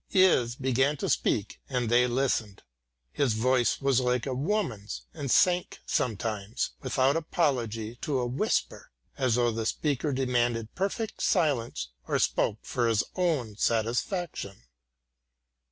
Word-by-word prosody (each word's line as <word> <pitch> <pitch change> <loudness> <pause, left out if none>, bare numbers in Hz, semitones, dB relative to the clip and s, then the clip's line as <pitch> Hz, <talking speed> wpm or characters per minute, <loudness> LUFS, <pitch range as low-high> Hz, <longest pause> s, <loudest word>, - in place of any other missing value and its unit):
Is 180 - +4
began 130 +3 +1
to - - -2
speak 105 -1 0
and 125 -3 -1
they 120 +2 +4
listened. 120 -5 -1 0.5
His 135 -6 +1
voice 125 +2 +2
was 135 -2 +2
like 125 -1 0
a 135 - -2
woman's 130 - -2
and 145 -4 -5
sank 180 +6 +3
sometimes, 110 -1 -1
without 130 +1 +2
apology, 120 -9 -1
to 145 -3 -1
a 125 - 0
whisper, 120 +2 -1 0.3
as 130 -4 +1
though 120 -1 +2
the 110 0 -2
speaker 150 +1 -1
demanded 120 -4 0
perfect 200 +4 -3
silence 135 - +1 0.2
or - - +1
spoke 105 - +1
for 120 -2 0
his 110 -2 +2
own 150 - 0
satisfaction. 115 - -1
125 Hz, 130 wpm, -28 LUFS, 115-145 Hz, 0.5 s, Is